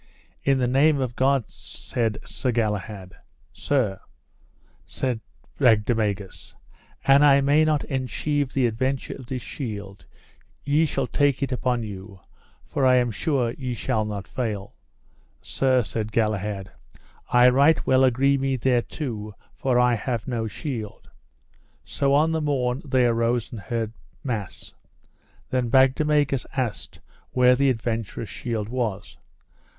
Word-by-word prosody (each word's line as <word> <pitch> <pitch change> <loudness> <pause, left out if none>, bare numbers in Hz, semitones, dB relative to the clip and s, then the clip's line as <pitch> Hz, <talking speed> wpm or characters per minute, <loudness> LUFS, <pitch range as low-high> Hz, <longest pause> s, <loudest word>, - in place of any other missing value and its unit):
In 135 -1 +3
the 125 -1 +1
name 140 +4 +3
of 125 -3 -2
God, 135 -1 +2
said 115 -4 -4
Sir 125 - -2
Galahad. 105 -4 -3 0.4
Sir, 120 -10 0 0.8
said 125 -4 -3 0.4
Bagdemagus, 105 -3 +1 0.5
an 135 +1 +6
I 140 -2 +6
may 145 +3 +4
not 155 -2 +1
enchieve 135 +1 -2
the 135 -2 +1
adventure 130 +4 -1
of 130 - -11
this 125 -1 -4
shield 100 -7 -7 0.6
ye 150 +3 +2
shall 135 -3 -1
take 140 0 +1
it 135 - -2
upon 125 -2 0
you, 100 -2 -9 0.4
for 140 - -3
I 130 -1 +6
am 120 -2 +2
sure 125 - 0
ye 125 -2 -3
shall 110 -1 -1
not 100 -4 -5
fail. 105 -4 -4 0.7
Sir, 130 -2 +1
said 110 +1 -4
Galahad, 105 -3 -1 0.6
I 125 0 +6
right 140 +5 +4
well 130 0 +4
agree 135 +2 +3
me 135 0 0
thereto, 120 -3 -2 0.2
for 130 -2 0
I 125 0 +4
have 115 0 -3
no 115 -3 -2
shield. 110 -3 -6 0.7
So 140 0 +1
on 155 +3 +3
the 160 -1 0
morn 135 -3 0
they 130 -4 +2
arose 115 0 +1
and 115 - -7
heard 115 +2 -3 0.3
mass. 110 -8 -5 0.8
Then 125 -2 0
Bagdemagus 135 +1 +3
asked 125 -5 -3 0.3
where 125 0 +5
the 140 +1 +3
adventurous 115 -2 -3
shield 115 -4 -4
was. 115 -5 -4
125 Hz, 135 wpm, -24 LUFS, 110-135 Hz, 0.8 s, an